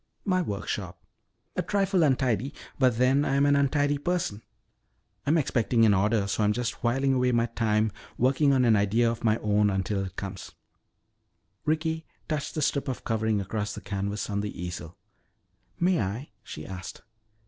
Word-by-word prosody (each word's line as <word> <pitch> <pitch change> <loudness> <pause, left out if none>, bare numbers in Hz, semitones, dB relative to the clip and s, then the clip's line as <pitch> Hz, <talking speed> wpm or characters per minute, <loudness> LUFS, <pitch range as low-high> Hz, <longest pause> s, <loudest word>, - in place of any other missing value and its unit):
"My 185 -2 +2
workshop. 100 - -4 0.5
A - - +1
trifle 195 -2 +1
untidy, 130 -3 +1 0.2
but 130 -4 +3
then 130 +3 +4
I 135 - 0
am 140 +1 +4
an 145 0 +4
untidy 145 +1 +2
person. 155 - -1 0.9
I'm 155 +3 +4
expecting 120 -5 +2
an 105 - +5
order 105 +2 +2
so 100 +2 0
I'm 105 0 +3
just 120 +1 -3
whiling 135 +3 +2
away 125 -1 +2
my 115 0 +3
time 110 -2 +1 0.3
working 135 +3 +3
on 130 -2 +3
an 115 -2 +5
idea 110 +3 +3
of 115 - -6
my 110 -1 +3
own 105 -1 +2
until 95 +1 -1
it 95 -1 -7
comes." 95 -5 -6 1.1
Ricky 160 +1 -1 0.2
touched 150 -1 -3
the 155 - 0
strip 140 0 0
of 130 - -4
covering 110 -2 0
across 105 +1 -3
the 105 - -7
canvas 100 +1 -3
on 100 -1 -1
the 105 -3 -5
easel. 90 0 -6 0.8
"May 180 -5 +3
I?" 105 +9 -3
she 75 - -8
asked. 95 -1 -8
115 Hz, 170 wpm, -27 LUFS, 100-140 Hz, 1.1 s, an